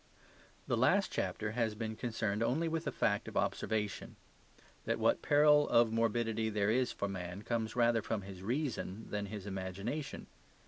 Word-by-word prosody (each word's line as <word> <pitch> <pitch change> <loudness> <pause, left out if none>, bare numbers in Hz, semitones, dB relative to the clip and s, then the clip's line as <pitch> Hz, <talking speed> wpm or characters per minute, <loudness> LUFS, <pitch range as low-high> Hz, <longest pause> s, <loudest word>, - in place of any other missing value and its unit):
The - - 0
last - - +3
chapter 105 0 -2
has 110 -2 0
been 110 0 -4
concerned 110 -2 -2
only 140 +8 +1
with 165 0 -2
a - - 0
fact 100 -2 0
of - - -5
observation: 105 -2 -1 0.7
that - - 0
what - - +2
peril 150 0 +5
of 115 -1 +5
morbidity 115 -1 +1
there 105 -1 +1
is 125 +2 +2
for 100 - -3
man 95 0 -5
comes 115 -1 -2
rather 120 -2 +3
from 105 -1 -3
his 95 -2 -9
reason 115 -3 -2
than 105 -1 -2
his 105 -1 -7
imagination. 100 +9 -4
110 Hz, 165 wpm, -34 LUFS, 100-120 Hz, 0.7 s, peril